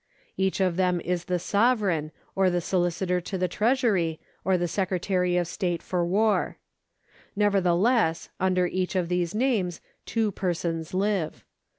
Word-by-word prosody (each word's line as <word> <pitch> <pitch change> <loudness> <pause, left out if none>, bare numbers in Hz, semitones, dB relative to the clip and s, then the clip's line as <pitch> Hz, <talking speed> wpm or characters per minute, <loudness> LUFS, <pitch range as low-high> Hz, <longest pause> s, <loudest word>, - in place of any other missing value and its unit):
Each 190 0 0
of 185 -3 +1
them 180 -2 +2
is 180 0 -2
the 180 - 0
Sovereign, 200 -6 +1 0.2
or 190 -1 +3
the 175 - 0
Sohcitor 180 0 0
to 190 - -4
the 185 0 +1
Treasury, 210 - +1 0.2
or 190 0 +2
the 175 0 0
Secretary 180 0 0
of 175 -1 +1
State 175 -2 -2
for 180 -2 -1
War, 205 +5 +1 0.8
Nevertheless 200 -1 +2
under 185 -1 +2
each 185 +1 -2
of 180 -2 0
these 180 0 -1
names 215 -9 0 0.3
two 225 -2 0
persons 170 -3 -2
live. 195 -4 -1
180 Hz, 145 wpm, -26 LUFS, 175-200 Hz, 0.8 s, or